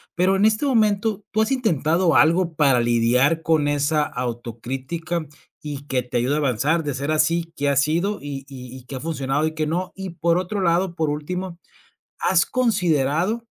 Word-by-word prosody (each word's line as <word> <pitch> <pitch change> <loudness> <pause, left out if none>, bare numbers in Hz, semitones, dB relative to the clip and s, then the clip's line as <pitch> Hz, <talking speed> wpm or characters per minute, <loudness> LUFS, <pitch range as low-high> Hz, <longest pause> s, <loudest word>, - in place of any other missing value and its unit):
Pero 185 +2 +2
en 195 - +1
este 220 +5 +2
momento, 215 -4 +1
¿tú 220 - +1
has 220 - 0
intentado 170 - +1
algo 165 +1 +3
para 140 -5 +4
lidiar 120 +7 +2
con 155 -3 +2
esa 145 +1 +1
autocrítica 130 +7 -4 0.4
y 145 -2 -7
que 130 -1 0
te 125 0 -3
ayude 125 +4 +1
a - - 0
avanzar? 145 +4 +1
De 145 -2 -2
ser 140 +3 -4
así, 165 +2 +1
¿qué 145 0 0
ha 140 - +1
sido? 170 +9 +1
Y 140 -2 -6
y 125 -2 -10
y, 130 - -11
¿qué 135 - -8
ha - - -4
funcionado 145 -1 -1
y 160 - -4
qué 155 - -1
no? 180 +3 -2
Y 190 -1 -6
por 170 0 +1
otro 185 +3 -2
lado, 175 0 +1
por 160 -3 0
último, 170 +4 -4 0.6
¿has 170 -3 +3
considerado 185 - 0
160 Hz, 185 wpm, -22 LUFS, 140-185 Hz, 0.6 s, para